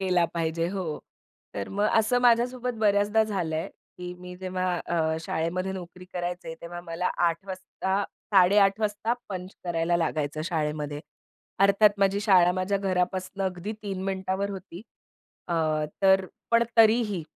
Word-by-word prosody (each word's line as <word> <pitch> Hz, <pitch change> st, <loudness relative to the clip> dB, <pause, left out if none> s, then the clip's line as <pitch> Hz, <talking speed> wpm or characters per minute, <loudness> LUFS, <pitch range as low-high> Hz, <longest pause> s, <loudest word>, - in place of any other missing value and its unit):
केला 180 Hz, -2 st, +2 dB
पाहिजे. 165 Hz, 0 st, 0 dB
हो, 180 Hz, -6 st, -3 dB, 0.6 s
तर 100 Hz, -, -4 dB
मग 205 Hz, +1 st, 0 dB
असं 220 Hz, +3 st, +3 dB
माझ्यासोबत 245 Hz, +1 st, +2 dB
बऱ्याचदा 205 Hz, +1 st, +3 dB
झालंय 165 Hz, -6 st, -2 dB, 0.3 s
की 180 Hz, 0 st, -6 dB
मी 180 Hz, 0 st, -9 dB
जेव्हा 185 Hz, -1 st, -2 dB
अ, 160 Hz, -2 st, 0 dB
शाळेमध्ये 175 Hz, +4 st, -2 dB
नोकरी 180 Hz, -1 st, -8 dB
करायचे 175 Hz, -2 st, -4 dB
तेव्हा 175 Hz, +1 st, -7 dB
मला 175 Hz, +1 st, -3 dB
08:00 170 Hz, +1 st, +1 dB
वाजता 190 Hz, +1 st, -2 dB, 0.3 s
08:30 195 Hz, +2 st, +5 dB
वाजता 215 Hz, +2 st, 0 dB, 0.2 s
पंच 185 Hz, -1 st, -5 dB
करायला 170 Hz, 0 st, +1 dB
लागायचं 155 Hz, -2 st, -1 dB
शाळेमध्ये. 150 Hz, -3 st, -2 dB, 0.6 s
अर्थात 200 Hz, +2 st, +6 dB
माझी 200 Hz, +1 st, +2 dB
शाळा 185 Hz, -4 st, +5 dB
माझ्या 185 Hz, +2 st, 0 dB
घरापासून 185 Hz, 0 st, -1 dB
अगदी 185 Hz, +2 st, -3 dB
3 195 Hz, -2 st, -4 dB
मिनिटावर 190 Hz, +1 st, -2 dB
होती. 190 Hz, -1 st, -8 dB, 0.7 s
अ, 170 Hz, -, 0 dB, 0.5 s
तर 190 Hz, 0 st, +5 dB, 0.3 s
पण 230 Hz, 0 st, +5 dB
तरीही 220 Hz, -4 st, +4 dB
185 Hz, 135 wpm, -27 LUFS, 175-200 Hz, 0.7 s, अर्थात